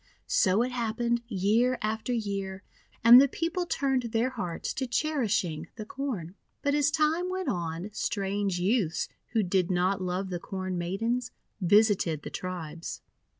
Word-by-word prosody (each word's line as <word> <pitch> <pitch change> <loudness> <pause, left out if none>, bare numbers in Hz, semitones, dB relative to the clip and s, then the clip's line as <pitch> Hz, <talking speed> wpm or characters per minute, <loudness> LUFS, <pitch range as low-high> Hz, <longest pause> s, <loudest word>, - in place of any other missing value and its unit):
So 235 - +3
it 255 - -2
happened 235 0 0
year 225 +4 +2
after 220 +3 -2
year, 200 -4 -3 0.4
and 240 +3 +10
the 280 - +5
People 335 +5 -2
turned 270 -4 +1
their 235 +2 0
hearts 180 -9 -4
to 260 - -2
cherishing 225 - 0
the 215 - -6
Corn. 215 - -4 0.3
But 285 - +2
as 290 -1 +3
time 320 +4 +1
went 375 0 -2
on, 170 +2 -3
strange 200 -2 -1
youths, 185 -3 +1 0.2
who 220 -2 +3
did 185 -1 +1
not 185 +1 +1
love 185 +1 -2
the 175 - -2
Corn 185 0 -4
Maidens, 225 +8 -1 0.3
visited 185 -5 +3
the - - -6
tribes. 170 -3 -6
215 Hz, 150 wpm, -28 LUFS, 185-250 Hz, 0.4 s, and